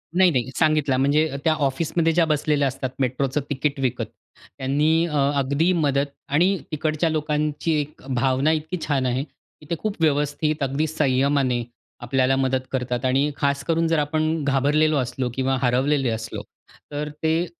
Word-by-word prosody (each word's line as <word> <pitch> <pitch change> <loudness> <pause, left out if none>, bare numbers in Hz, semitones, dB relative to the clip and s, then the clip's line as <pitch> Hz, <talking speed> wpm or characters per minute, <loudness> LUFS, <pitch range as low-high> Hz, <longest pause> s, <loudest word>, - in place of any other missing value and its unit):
नाही, 185 -1 +5
नाही. 125 -2 -1
सांगितला, 150 -4 +2
म्हणजे 145 +4 +2
त्या 160 - +3
ऑफिसमध्ये 160 +3 0
ज्या 170 0 +3
बसलेल्या 150 -2 +1
असतात 130 0 -3
मेट्रोचं 135 +2 0
तिकीट 140 0 -1
विकत, 130 -3 -1 0.5
त्यांनी 150 +5 +2
अ, 150 - -4 0.2
अगदी 140 +6 +1
मदत 140 -4 +1 0.2
आणि 180 +7 +3
तिकडच्या 155 +2 0
लोकांची 150 0 -1
एक 145 +1 -10
भावना 130 +4 +2
इतकी 160 +3 -2
छान 140 -3 +1
आहे 130 +1 0
की 150 0 -21
ते 170 - 0
खूप 210 +3 -2
व्यवस्थित, 150 0 +1
अगदी 140 +4 0
संयमाने 135 -4 +1 0.4
आपल्याला 130 +2 +1
मदत 130 -1 +1
करतात. 125 -1 -2
आणि 135 +3 +2
खास 140 -1 0
करून, 165 0 +2
जर 165 -1 +2
आपण 155 +1 0
घाबरलेलो 145 +3 +2
असलो 125 -1 -2
किंवा 135 0 0
हरवलेले 130 +1 +2
असलो, 115 0 -4 0.5
तर 150 +1 -3
ते 160 +2 +2
145 Hz, 155 wpm, -23 LUFS, 135-155 Hz, 0.5 s, नाही